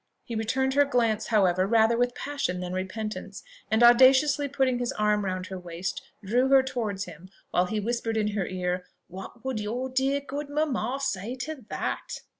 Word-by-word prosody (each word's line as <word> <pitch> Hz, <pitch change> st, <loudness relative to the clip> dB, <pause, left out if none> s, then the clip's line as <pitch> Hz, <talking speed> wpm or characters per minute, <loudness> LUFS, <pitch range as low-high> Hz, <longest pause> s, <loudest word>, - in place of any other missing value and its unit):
He 240 Hz, -, -7 dB
returned 260 Hz, +4 st, 0 dB
her 285 Hz, +1 st, +5 dB
glance, 235 Hz, -6 st, +1 dB
however, 190 Hz, -4 st, +3 dB
rather 225 Hz, +1 st, +4 dB
with 245 Hz, +1 st, 0 dB
passion 280 Hz, -11 st, -3 dB
than 180 Hz, 0 st, -4 dB
repentance, 215 Hz, +4 st, -5 dB, 0.3 s
and 220 Hz, +2 st, +3 dB
audaciously 265 Hz, +4 st, +6 dB
putting 265 Hz, -3 st, +1 dB
his 245 Hz, -1 st, -1 dB
arm 210 Hz, -1 st, +1 dB
round 185 Hz, -1 st, -2 dB
her 190 Hz, 0 st, -6 dB
waist, 180 Hz, +1 st, -5 dB, 0.2 s
drew 245 Hz, +6 st, +2 dB
her 270 Hz, -1 st, +6 dB
towards 220 Hz, -7 st, -3 dB
him, 175 Hz, 0 st, -11 dB, 0.2 s
while 180 Hz, +1 st, +2 dB
he 215 Hz, +3 st, -2 dB
whispered 225 Hz, +1 st, -2 dB
in 210 Hz, -1 st, +1 dB
her 200 Hz, -3 st, -2 dB
ear, 180 Hz, 0 st, -3 dB, 0.2 s
"What 190 Hz, +7 st, -10 dB
would 260 Hz, -4 st, -2 dB
your 240 Hz, +5 st, -3 dB
dear 265 Hz, +2 st, +1 dB
good 285 Hz, +1 st, -6 dB
mamma 280 Hz, -4 st, -1 dB
say 235 Hz, -3 st, -2 dB
to 275 Hz, -5 st, -6 dB
that?" -, -, -4 dB
225 Hz, 180 wpm, -27 LUFS, 190-265 Hz, 0.3 s, audaciously